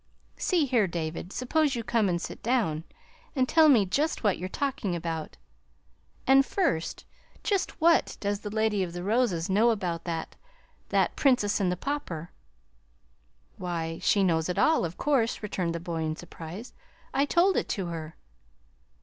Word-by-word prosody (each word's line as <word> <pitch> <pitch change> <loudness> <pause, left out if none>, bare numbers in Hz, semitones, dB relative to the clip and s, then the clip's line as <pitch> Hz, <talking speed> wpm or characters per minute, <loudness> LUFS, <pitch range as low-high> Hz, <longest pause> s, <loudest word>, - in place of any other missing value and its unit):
"See 345 -5 +2
here, 240 -7 +2
David, 170 +1 -4
suppose 280 +4 +1
you 235 - -3
come 220 -3 +1
and 175 -1 0
sit - - -7
down, 205 -11 0 0.5
and 260 -2 +2
tell 320 +1 +6
me 230 -8 +6
just 285 - 0
what 205 -3 +2
you're 185 +1 -4
talking 230 -8 -2
about. 165 -2 -4 0.9
And 270 +1 +6
first 275 - -1 0.4
just 395 -3 -1
what 335 +1 +3
does 205 0 -1
the 210 - -6
Lady 215 -1 +1
of 175 -2 -3
the 175 0 -5
Roses 200 -5 +1
know 210 +5 +4
about 180 -7 -2
that 165 -2 -4 0.5
that - - +2
'Princess 245 -8 +2
and 185 -3 +1
the 180 - -2
Pauper'?" 180 - -4 1.3
"Why, 165 -2 -3
she 200 - +3
knows 165 -2 +1
it 180 - -2
all, 315 - +3
of 170 +1 -6
course," 250 -7 +1
returned 180 -5 -2
the - - -2
boy 170 -1 -4
in 155 0 -1
surprise. 175 +6 -9 0.4
"I 275 +1 +3
told 345 +5 +3
it - - -1
to 195 -4 -2
her." 165 -1 -6
200 Hz, 165 wpm, -28 LUFS, 170-255 Hz, 1.3 s, tell